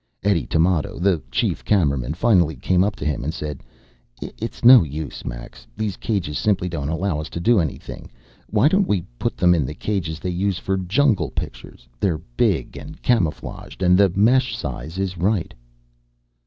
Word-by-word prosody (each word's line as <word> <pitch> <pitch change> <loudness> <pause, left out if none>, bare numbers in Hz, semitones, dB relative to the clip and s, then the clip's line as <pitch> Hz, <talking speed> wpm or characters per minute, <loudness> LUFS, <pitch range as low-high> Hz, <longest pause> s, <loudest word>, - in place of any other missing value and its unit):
Eddie 100 -4 +1
Tamoto, 80 -1 +1
the 90 -3 +2
chief - - -1
cameraman, 70 - +1
finally 90 -6 +3
came 90 +7 +2
up 105 +1 -1
to - - -6
him 75 -3 -1
and 80 +3 -3
said, 75 -3 -5 0.6
"It's 115 +1 -6
no 125 -1 +10
use, 75 -1 -5
Max. - - -8
These 105 -3 -2
cages 95 -9 -2
simply 100 -4 +1
don't 75 -5 -3
allow 85 0 -1
us 75 - -7
to - - -5
do 115 +5 +3
anything. 80 -5 -5 0.4
Why 110 +5 +3
don't 190 +4 +2
we 95 -4 0 0.2
put - - -2
them 90 -1 +4
in 80 -4 +2
the 65 +4 -5
cages 85 -5 -3
they 90 - -3
use 95 +1 -1
for 95 - -2
jungle 95 - +1
pictures? - - -7
They're 90 -5 +1 0.2
big - - +1
and 155 +1 -10
camouflaged, 95 -4 -1
and 90 0 +5
the 100 +1 +5
mesh 125 +6 +3
size 80 +8 -6
is 95 -2 -3
right." 95 0 0
90 Hz, 175 wpm, -22 LUFS, 80-105 Hz, 0.6 s, no